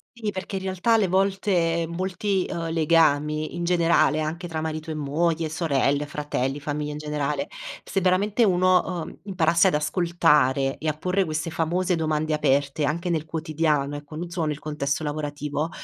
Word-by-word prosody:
Sì, 220 -3 -3
perché 195 0 -4
in - - -5
realtà 190 +4 +1
alle 215 -4 +4
volte 185 -3 +1
molti, 185 +2 -1
uhm, 165 -2 -3
legami 155 -2 +2
in 175 - -3
generale, 170 -3 +3
anche 170 +3 -3
tra 160 -1 -4
marito 155 0 -4
e - - -2
moglie, 160 +2 0
sorelle, 145 -2 +1
fratelli, 145 -2 -2
famiglia 150 0 -3
in 150 - -6
generale, 150 -1 -2 0.4
se 195 - -1
veramente 195 +5 +2
uno, 185 -1 +2
uhm, - - -10
imparasse 170 -4 +3
ad - - -3
ascoltare 150 -5 +2
e 155 - -5
a 155 - +2
porre 185 +4 0
queste 155 +1 -2
famose 175 +3 0
domande 155 -1 -1
aperte 140 0 +1
anche 170 +4 -1
nel 160 -2 -1
quotidiano, 155 -3 -1
ecco, 145 +1 -9
non 170 +2 -5
solo 170 -3 -2
nel 150 -1 -3
contesto 150 0 -2
lavorativo, 150 +1 -3
160 Hz, 165 wpm, -24 LUFS, 150-180 Hz, 0.4 s, alle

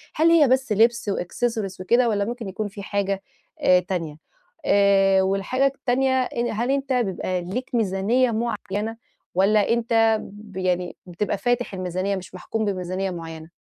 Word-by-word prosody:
هل 325 +2 +4
هي 310 -5 +6
بس 260 -2 +1
لبْس 225 0 +3
وaccessories 195 +1 -2
وكده 235 +5 +3
والّا 200 -2 0
ممكن 235 -2 -5
يكون 205 +2 -3
في 200 0 -9
حاجة 200 -1 -1 0.4
آآ 180 0 +5
تانية؟ 175 -5 -4 0.5
آآ 195 -1 +4
والحاجة 195 +8 +1
التانية 260 0 +1
إن 240 -1 -2
هل 235 +5 -1
أنت 275 -1 0
بيبقى 190 -6 -1
ليك 200 +9 -4
ميزانية 225 +4 +2
معينة 220 -1 -3 0.4
والّا 205 +2 +3
أنت 225 -2 +3
ب 205 -1 -12
يعني 180 -1 -1
بتبقى 190 +3 -2
فاتح 245 -2 -1
الميزانية 185 +2 -2
مش 185 0 -8
محكوم 220 +4 -3
بميزانية 185 0 -2
معيّنة؟ 165 -1 -8
205 Hz, 150 wpm, -23 LUFS, 190-235 Hz, 0.5 s, هي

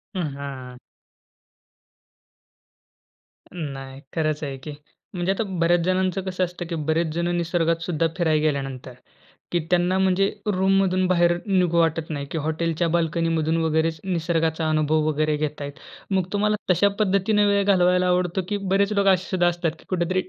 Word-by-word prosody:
हं, 185 - -1 0.2
हां. 130 -3 -7 2.7
नाही. 135 -5 -7
खरंच 155 -2 -1
आहे 140 -2 -4
की. 155 - -6 0.4
म्हणजे 180 0 0
आता 195 +3 -1 0.2
बऱ्याच 170 +1 +3
जणांचं 185 0 +1
कसं 185 0 -2
असतं 175 0 -4
की 170 - -2
बरेच 160 +2 0
जण 170 +1 -1
निसर्गात 165 -1 0
सुद्धा 165 -2 0
फिरायला 160 -4 +2
गेल्यानंतर, 135 -4 -2 0.6
की 175 - +1
त्यांना 180 +1 +2
म्हणजे 190 +1 +2 0.2
रूममधून 190 0 +2
बाहेर 175 -1 +3
निघू 180 -3 +2
वाटत 165 -1 +1
नाही, 145 -3 -4
की - - -2
हॉटेलच्या 160 +2 -1
बाल्कनीमधून 165 -1 0
वगैरेच 160 0 0
निसर्गाचा 165 -3 0
अनुभव 155 0 +2
वगैरे 155 0 +1
घेत 150 0 -3
आहेत. 145 0 -4 0.4
मग 190 -2 +2
तुम्हाला 210 +1 +2 0.2
तशा 180 +3 +4
पद्धतीने 205 +1 +2
वेळ 200 0 +3
घालवायला 180 -2 +3
आवडतो, 180 +1 +1
की 205 - 0
बरेच 200 +1 +1
लोक 200 -1 +2
असे 185 -1 +3
सुद्धा 180 -2 +2
असतात 175 -1 0
की - - -19
कुठेतरी 185 0 0
170 Hz, 150 wpm, -23 LUFS, 155-185 Hz, 2.7 s, तशा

